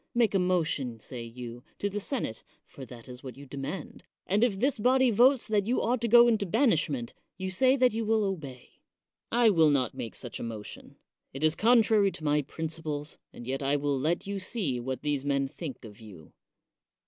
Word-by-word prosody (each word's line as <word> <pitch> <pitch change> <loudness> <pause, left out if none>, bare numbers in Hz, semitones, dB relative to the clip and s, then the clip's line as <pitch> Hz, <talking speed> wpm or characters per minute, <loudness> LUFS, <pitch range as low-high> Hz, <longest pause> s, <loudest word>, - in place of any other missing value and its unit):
Make 235 -3 +3
a 195 - +3
motion, 155 -10 0
say 120 +2 -7
you, 120 +1 -8
to 205 - -1
the 205 +1 -3
senate 205 - -3 0.2
(for 135 - -11
that 120 -1 -12
is 125 0 -10
what 130 -1 -8
you 140 - -11
demand), 140 +5 -6 0.2
and 205 +4 +2
if 210 -6 +1
this 265 +1 +1
body 255 +2 +4
votes 245 +4 +4
that 210 -2 0
you 245 - +1
ought 240 +1 0
to 235 - 0
go 240 +1 +7
into 220 -4 +1
banishment, 155 - +1 0.2
you 190 0 -4
say 260 +7 +3
that 255 -4 +3
you 225 +1 -1
will 220 0 +2
obey. 150 -11 -6 0.5
I 235 -1 +5
will 165 -5 +5
not 130 -5 +1
make 115 - -6
such - - -6
a - - -5
motion 110 -3 -8 0.2
— - - -54
it 135 - -5
is 155 0 +3
contrary 220 -2 +4
to - - -9
my 150 0 +2
principles, 155 0 -5
and 120 - -11
yet 135 +3 -3
I 140 +1 +1
will 145 -1 0
let 160 +6 0
you 200 0 -3
see 185 - -2
what 130 +2 -5
these 145 -2 -1
men 140 -1 0
think 140 -3 -8
of 105 -2 -12
you. 95 -8 -13
160 Hz, 205 wpm, -28 LUFS, 135-220 Hz, 0.5 s, go